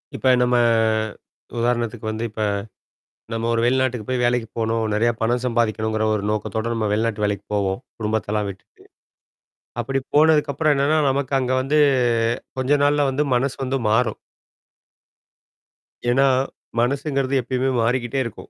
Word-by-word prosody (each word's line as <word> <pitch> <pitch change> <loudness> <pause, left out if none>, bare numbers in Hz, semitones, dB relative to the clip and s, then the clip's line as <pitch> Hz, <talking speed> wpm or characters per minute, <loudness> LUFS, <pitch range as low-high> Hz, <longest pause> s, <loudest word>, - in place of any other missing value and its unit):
இப்ப 130 - +1
நம்ம, 125 0 +2 1.0
உதாரணத்துக்கு 120 -1 -1
வந்து 110 +1 -3
இப்ப, 110 +1 -6 0.9
நம்ம 115 0 -2
ஒரு 115 - +1
வெளிநாட்டுக்கு 125 -3 +1
போய் 125 -1 0
வேலைக்கு 120 -2 +1
போணும். 115 0 0
நிறையா 115 +3 +2
பணம் 120 +2 0
சம்பாதிக்கணுங்கிற 110 -2 0
ஒரு 105 - -2
நோக்கத்தோட, 110 +1 -2
நம்ம 110 -2 -1
வெளிநாட்டு 105 0 0
வேலைக்கு 100 -1 -2
போவோம். 95 +1 0 0.2
குடும்பத்தெல்லாம் 105 -1 -1
விட்டுட்டு. 95 - -15 1.0
அப்படி 135 +3 -2 0.2
போனதுக்கு 150 -1 +4
அப்புறம் 155 +1 +2
என்னன்னா, 145 +3 +2
நமக்கு 135 0 -1
அங்க 130 0 -1
வந்து, 145 +3 +1 0.8
கொஞ்ச 130 +2 +1
நாள்ல 145 0 +3
வந்து, 145 +3 0
மனசு 130 +2 -1
வந்து 135 +1 -1
மாறும். 110 0 +1 1.9
ஏன்னா, 135 +3 +4 0.5
மனசுங்கிறது 140 +2 0
எப்பயுமே 130 +2 -1
மாறிக்கிட்டே 120 +3 0
இருக்கும். 115 - -9
120 Hz, 130 wpm, -22 LUFS, 110-135 Hz, 1.9 s, போனதுக்கு